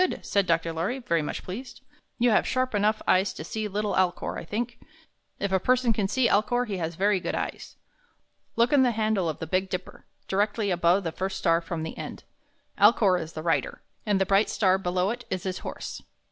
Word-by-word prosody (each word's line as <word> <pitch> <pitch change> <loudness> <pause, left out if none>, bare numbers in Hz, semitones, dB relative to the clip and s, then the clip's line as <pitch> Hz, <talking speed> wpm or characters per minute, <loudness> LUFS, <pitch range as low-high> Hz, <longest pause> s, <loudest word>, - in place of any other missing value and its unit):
said 200 -2 +1
Dr. 165 0 +1
Lorry, 180 +11 -1
very 170 -11 0
much 150 - -4
pleased. 235 +8 -8 0.4
"You 240 0 +3
have 215 - +3
sharp 255 -1 0
enough 210 +1 +1
eyes 185 +1 +3
to - - -7
see 215 +6 -3
little 210 +1 -2
Alcor, 185 -2 0
I - - -7
think. 235 +7 -4 0.6
If 200 - -1
a 190 - +3
person 250 +2 +2
can 210 -3 0
see 240 +4 +2
Alcor, 245 +4 +2
he 205 -4 -4
has 165 -1 -3
very 200 +2 +2
good - - -3
eyes. - - -5 0.8
Look 235 +4 +3
in 285 - +6
the 250 -2 +3
handle 215 -6 +1
of 155 - -4
the - - -5
Big 185 +4 0
Dipper, 185 0 -6 0.2
directly 205 +1 0
above 175 +2 +3
the 165 - -2
first 190 +3 -3
star 165 -2 +2
from 165 -1 -4
the 160 - -5
end. - - -7 0.6
Alcor 200 -3 +5
is 160 0 -8
the 155 - -6
Rider, 165 -1 -1 0.2
and 205 -3 +1
the 190 - +2
bright 195 +2 +3
star 190 -3 +2
below 180 +1 0
it 245 +1 -5
is 185 -2 -3
his 185 -1 -3
Horse." - - -6
195 Hz, 210 wpm, -26 LUFS, 180-220 Hz, 0.8 s, in